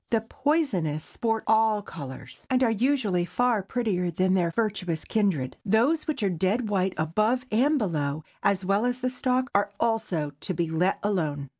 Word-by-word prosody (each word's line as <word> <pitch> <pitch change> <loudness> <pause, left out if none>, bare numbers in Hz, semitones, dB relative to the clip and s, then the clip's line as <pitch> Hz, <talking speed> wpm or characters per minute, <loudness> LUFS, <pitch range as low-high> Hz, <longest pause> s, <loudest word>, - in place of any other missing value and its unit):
The 225 -1 +2
poisonous 225 - 0
sport 225 -1 -2
all 220 -1 +3
colors, 140 -8 -9
and 260 0 +3
are 235 - +3
usually 225 -6 +1
far 240 +4 +1
prettier 195 -4 -1
than 185 +3 +1
their 175 -3 +2
virtuous 185 -5 -2
kindred. 185 -12 0
Those 240 +10 +2
which 290 -7 -2
are 200 - +2
dead 195 +7 0
white 190 -2 0
above 215 +11 +1
and 275 +8 +3
below, 155 - -1 0.2
as 195 -1 +1
well 200 +3 +2
as 245 +1 -1
the 255 0 0
stalk, 255 0 0
are 205 0 +2
also 215 -10 0
to 185 - -3
be 165 0 -1
let 180 +4 +1
alone. 155 -9 -1
205 Hz, 170 wpm, -26 LUFS, 175-235 Hz, 0.2 s, all